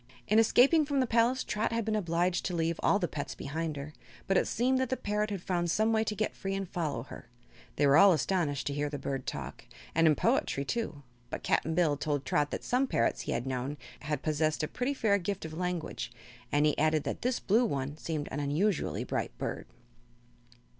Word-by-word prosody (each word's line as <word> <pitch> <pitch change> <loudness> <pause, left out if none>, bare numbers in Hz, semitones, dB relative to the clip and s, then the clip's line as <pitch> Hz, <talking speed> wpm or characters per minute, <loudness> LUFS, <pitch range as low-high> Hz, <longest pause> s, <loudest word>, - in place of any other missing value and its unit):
In 215 +2 +5
escaping 270 +8 +5
from 285 -1 0
the 260 - +3
palace 240 +2 +2
Trot 210 +2 -1
had 230 -1 -1
been 220 -1 0
obliged 175 -2 0
to 180 - -1
leave 165 0 0
all - - +4
the 180 -4 -1
pets 145 -2 -5
behind 160 +2 -3
her, 140 +2 -7 0.3
but 195 - +1
it - - +3
seemed 255 +3 +1
that 260 -2 0
the 260 - 0
parrot 210 +1 -1
had 195 -4 -4
found 175 -2 0
some 220 +6 +2
way 220 0 +3
to 210 - -2
get 215 +1 -1
free 195 0 -3
and 195 -1 -3
follow 150 -9 -2
her. 120 - -11 0.5
They 145 - +2
were 140 +1 +6
all 200 +4 +8
astonished 155 -3 0
to 140 - -1
hear 145 +1 -1
the 145 - -4
bird 135 -1 -4
talk - - -5 0.3
and 165 0 +4
in 155 - +5
poetry, 140 0 +1
too 165 - -3 0.3
but - - -5
Cap'n 160 +1 +1
Bill 155 -4 +3
told 145 -2 -2
Trot 145 +2 +1
that - - -4
some 255 +2 +1
parrots 115 - +1
he - - -4
had 120 - -2
known 130 +2 -3 0.2
had 150 0 -3
possessed 155 0 0
a - - 0
pretty 255 - -2
fair 205 -5 +2
gift 195 0 -3
of 160 - -7
language, 180 -5 -3 0.4
and 145 +1 +3
he 150 - +3
added 155 0 +2
that - - -4
this 250 0 0
blue 220 +5 +3
one 140 - -2
seemed 155 -2 -4
an 140 - -3
unusually 155 +7 0
bright - - -3
bird. - - -4
170 Hz, 220 wpm, -30 LUFS, 145-215 Hz, 0.5 s, all